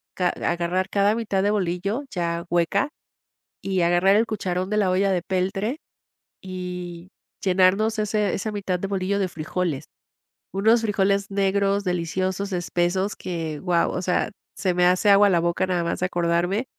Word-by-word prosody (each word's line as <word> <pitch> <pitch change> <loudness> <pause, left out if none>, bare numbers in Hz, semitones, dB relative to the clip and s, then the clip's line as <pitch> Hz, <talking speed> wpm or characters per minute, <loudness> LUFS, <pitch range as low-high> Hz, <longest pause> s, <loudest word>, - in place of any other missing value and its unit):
ca 180 -1 +1
agarrar 175 +2 -1
cada 200 +1 +3
mitad 205 -4 -1
de 205 - +2
bolillo 200 +6 -1
ya 170 -1 -2
hueca 175 - +1 0.7
y 190 -2 0
agarrar 175 +4 +4
el 225 - +4
cucharón 185 -3 -3
de 210 - +1
la 195 -3 +2
olla 195 +1 +2
de 180 - +1
peltre 195 +7 -1 0.7
y 180 -1 -6 0.3
llenarnos 195 +4 +3
ese 210 -1 0
esa 215 +3 -2
mitad 195 -3 -2
de 195 - -3
bolillo 195 0 -1
de 190 -2 0
frijoles. 155 -2 -3 0.7
Unos 220 +4 +3
frijoles 200 -2 +1
negros, 200 0 +1
deliciosos, 185 +2 -2
espesos, 180 +2 0
que, 160 -4 -4
wao, 175 -2 +1
o 180 - -3
sea, 185 +4 0 0.2
se 185 -2 0
me 180 0 +3
hace 185 +3 +4
agua 200 0 +6
la 175 -2 +3
boca 170 +2 0
nada 175 -2 0
más 170 - -2
de 180 - +1
acordarme. 175 +6 0
185 Hz, 160 wpm, -24 LUFS, 175-200 Hz, 0.7 s, agua